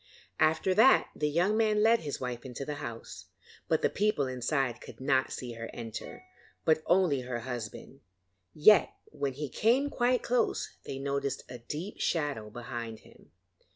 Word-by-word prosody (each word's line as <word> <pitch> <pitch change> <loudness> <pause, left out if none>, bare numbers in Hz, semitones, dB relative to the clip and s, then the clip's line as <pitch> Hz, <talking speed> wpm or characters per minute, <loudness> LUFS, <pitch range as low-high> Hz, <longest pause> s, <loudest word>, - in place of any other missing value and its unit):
After 160 +4 +3
that 225 +7 +5
the 150 - 0
young 175 +8 +2
man 215 -1 +3
led 230 +1 +5
his 145 -3 -5
wife 125 -2 -4
into 130 +1 -6
the 150 0 -4
house, 115 -1 -7 0.4
but - - +1
the - - +6
people 210 -8 +1
inside 130 -1 -1
could - - -11
not 130 0 +1
see 125 -2 -5
her 115 0 -7
enter, 115 - -7 0.4
but 160 -1 +4
only 175 -7 +3
her 125 -1 -4
husband; 120 +2 -7 0.5
yet 185 - +5 0.2
when 140 -3 -2
he 145 +3 -4
came 250 - +2
quite 245 0 +1
close, 245 0 0
they 135 - -5
noticed 140 0 -2
a 125 -1 -8
deep 155 - -6
shadow 145 -10 -1
behind 115 -1 -6
him. - - -19
140 Hz, 160 wpm, -30 LUFS, 125-185 Hz, 0.5 s, the